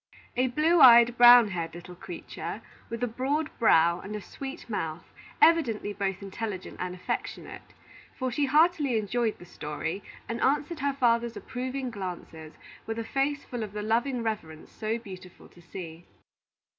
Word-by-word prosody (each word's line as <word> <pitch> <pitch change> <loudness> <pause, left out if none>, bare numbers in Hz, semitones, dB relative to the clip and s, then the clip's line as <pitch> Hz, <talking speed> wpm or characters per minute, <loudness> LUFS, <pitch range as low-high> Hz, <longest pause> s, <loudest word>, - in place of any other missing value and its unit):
A 255 +1 +2
blue 310 +7 +2
eyed, 235 -1 +8
brown 240 -2 +8
haired 170 -3 -4
little 175 +1 -10
creature, 175 0 -7 0.3
with 230 +1 -4
a - - +2
broad 275 +6 -1
brow, 170 -6 +4
and 205 +3 -7
a - - -3
sweet 270 - -8
mouth, 165 -7 -4 0.3
evidently 240 -11 +3
both 195 -1 -3
intelligent 200 -1 -6
and 180 0 -4
affectionate; 180 - -5 0.6
for 255 -1 -2
she 280 +3 0
heartily 300 -3 +3
enjoyed 220 +1 -1
the 175 - -13
story, 165 +3 -5 0.3
and 230 +1 -4
answered 295 +4 +1
her 280 0 0
father's 235 -3 +1
approving 255 0 -4
glances 175 -6 -7 0.3
with 225 0 -3
a 230 - -2
face 275 +4 -1
full 245 -2 -5
of 210 -2 -5
the 210 0 -4
loving 235 +3 0
reverence 165 -9 -5
so 220 +1 -2
beautiful 185 -5 -12
to 175 - -18
see. 170 -1 -9
230 Hz, 155 wpm, -28 LUFS, 185-255 Hz, 0.6 s, eyed